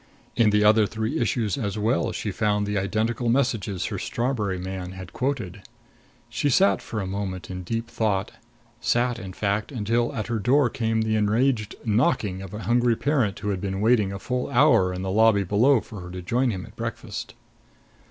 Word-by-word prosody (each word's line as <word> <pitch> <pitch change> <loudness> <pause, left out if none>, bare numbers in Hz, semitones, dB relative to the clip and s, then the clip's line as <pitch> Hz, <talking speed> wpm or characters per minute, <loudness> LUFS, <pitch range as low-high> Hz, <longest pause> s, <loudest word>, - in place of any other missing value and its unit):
In 115 -2 +4
the 105 0 +3
other 105 0 +5
three 110 +9 -2
issues 120 0 0
as 105 -3 -2
well, 110 +5 +1
she 105 - -3
found 105 +1 0
the 105 0 -2
identical 110 +5 0
messages 115 -7 0
her - - -3
strawberry 115 -6 -1
man 95 0 -5
had 95 -3 -9
quoted. 120 -8 -3 0.7
She 120 +4 -1
sat 100 -6 +4
for 110 - -5
a 100 - -2
moment 95 -1 -4
in 90 0 -5
deep 115 +6 -3
thought; 105 -5 -1 0.5
sat, 120 0 +1
in 95 -4 -7
fact, 100 +4 -1
until 120 0 0
at 110 - -2
her 115 -2 -2
door 125 +3 +3
came 110 -1 0
the 110 0 0
enraged 110 +2 +1
knocking 105 - +1
of 95 -2 -8
a 105 +1 -6
hungry 120 +3 +3
parent 130 -6 0
who 105 - -3
had 95 -3 -2
been 95 -1 -3
waiting 105 -2 +3
a 100 - -4
full 125 +4 -3
hour 125 -8 +4
in 90 0 -4
the 95 - -2
lobby 110 -1 +4
below 115 +7 +3
for 105 - -10
her 90 - -8
to 90 0 -7
join 125 +7 +1
him 95 -5 -4
at - - -16
breakfast. - - -6
110 Hz, 190 wpm, -25 LUFS, 100-120 Hz, 0.7 s, other